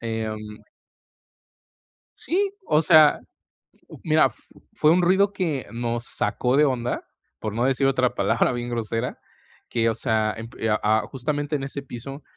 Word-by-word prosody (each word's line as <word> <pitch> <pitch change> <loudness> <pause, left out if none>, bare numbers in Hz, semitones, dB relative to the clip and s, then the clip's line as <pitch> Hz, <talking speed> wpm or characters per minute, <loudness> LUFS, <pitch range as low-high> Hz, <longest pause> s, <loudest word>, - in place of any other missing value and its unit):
em 110 -1 -3 1.8
Sí, 395 +3 -1
o 150 - +4
sea, 155 -1 +6 0.5
f - - -30 0.2
mira, 155 -2 +4
f 120 - -7 0.3
fue 155 - +3
un 180 +1 +3
ruido 195 +3 +3
que 160 - -2
nos 120 0 -3
sacó 125 +2 -1
de 150 - +5
onda, 125 -4 -1 0.4
por 110 - -3
no 120 - 0
decir 135 +1 +2
otra 130 -2 +1
palabra - - +1
bien 120 0 -4
grosera 115 +1 -3 0.5
que, 115 -1 +1
o - - -2
sea, 110 -3 0
emp 115 +1 -9
eh, 110 - 0
a 105 - +2 0.2
a - - -3
justamente 145 +3 -2
en 135 - -4
ese 140 +1 -5
piso 135 +2 -8
130 Hz, 160 wpm, -24 LUFS, 115-150 Hz, 1.8 s, sea